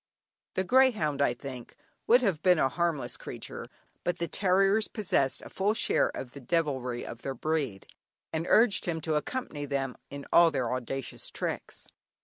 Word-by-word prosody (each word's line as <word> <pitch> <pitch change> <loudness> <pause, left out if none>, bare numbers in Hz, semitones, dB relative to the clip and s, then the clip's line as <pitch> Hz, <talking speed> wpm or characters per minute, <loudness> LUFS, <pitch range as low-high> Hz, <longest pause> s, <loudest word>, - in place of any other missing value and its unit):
The 190 - +1
greyhound, 210 - +3
I 120 -3 +3
think, 125 -1 -8 0.3
would 245 +2 +6
have 185 -8 +1
been 180 -2 +5
a 135 - +3
harmless 170 -1 -1
creature, - - -7 0.4
but 175 -1 -1
the 170 - -2
terriers 195 +4 +3
possessed 145 - 0
a - - -9
full 205 +3 0
share - - +2
of 125 - -6
the 140 - -10
devilry 130 -5 -1
of 120 - -8
their 135 -1 -4
breed, 140 -7 -2 0.5
and 160 +1 -2
urged 225 -2 +4
him 165 -2 -1
to 160 0 -1
accompany 150 - -3
them 135 -2 -2
in 140 0 -7
all 170 -1 +8
their 130 -5 -1
audacious 130 +1 -4
tricks. - - -5
155 Hz, 165 wpm, -29 LUFS, 135-185 Hz, 0.5 s, all